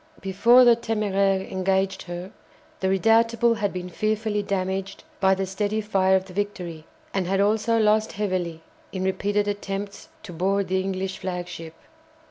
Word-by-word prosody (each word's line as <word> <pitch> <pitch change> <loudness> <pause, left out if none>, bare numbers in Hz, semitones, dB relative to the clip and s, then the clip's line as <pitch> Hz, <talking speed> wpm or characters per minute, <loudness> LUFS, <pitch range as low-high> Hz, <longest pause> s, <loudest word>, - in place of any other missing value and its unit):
Before 235 +6 +5
the 240 -1 +7
"Téméraire" 200 -4 0
engaged 190 0 0
her, 175 +2 -6 0.5
the 190 - 0
"Redoutable" 230 +3 +3
had 205 -2 -1
been 180 -1 -5
fearfully 215 +2 -1
damaged 195 -1 -3 0.2
by 190 -1 +4
the 195 0 -2
steady 205 +3 -2
fire 190 -3 +2
of 190 0 +1
the 190 - -12
"Victory," 180 -5 -4 0.3
and 190 -2 -1
had 195 +1 +1
also 215 +3 +2
lost 215 0 +2
heavily 180 -5 -2 0.3
in 185 -1 -3
repeated 205 +2 0
attempts 200 0 -5
to 180 - -9
board 190 +3 0
the 190 0 +1
English 190 0 -3
flagship. 175 -3 -6
195 Hz, 150 wpm, -24 LUFS, 185-210 Hz, 0.5 s, the